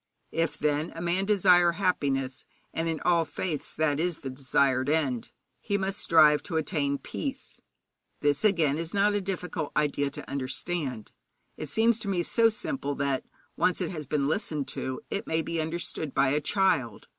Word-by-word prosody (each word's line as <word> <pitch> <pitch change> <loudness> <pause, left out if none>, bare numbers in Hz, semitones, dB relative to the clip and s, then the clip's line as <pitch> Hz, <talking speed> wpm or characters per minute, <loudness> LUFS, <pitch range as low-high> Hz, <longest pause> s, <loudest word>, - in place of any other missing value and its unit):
If, 165 -1 -1
then, 150 +2 0
a - - -6
man 175 +3 0
desire 180 -4 +5
happiness 140 -9 -1 0.3
and 165 0 -1
in 160 -2 -2
all 170 -2 +3
faiths 155 0 -4
that 150 -2 +1
is 175 0 -1
the 135 - -5
desired 130 0 +1
end 140 -7 0 0.3
he 200 -1 -1
must 195 0 -2
strive 155 -2 +5
to 165 - -3
attain 145 -3 0
peace. 275 - -6 0.6
This, 145 -1 +1
again, 165 -8 +3
is 165 +3 -3
not 205 +1 +3
a 205 - 0
difficult 180 -5 -4
idea 145 -1 +1
to 140 - -9
understand. 135 -2 -3 0.4
It 155 - -6
seems 225 +6 +3
to 215 - -7
me 185 -3 +1
so 230 +5 +4
simple 215 - -3
that, 140 -1 -1 0.3
when - - +3
once 180 - -2
it - - -2
has 155 -5 -6
been 140 -1 0
listened 155 -4 -1
to, 130 0 -4
it 200 - -3
may 160 0 0
be 165 0 -2
understood 160 -2 -3
by 135 0 +4
a 150 +2 +1
child. 170 - +1
160 Hz, 180 wpm, -28 LUFS, 140-180 Hz, 0.6 s, desire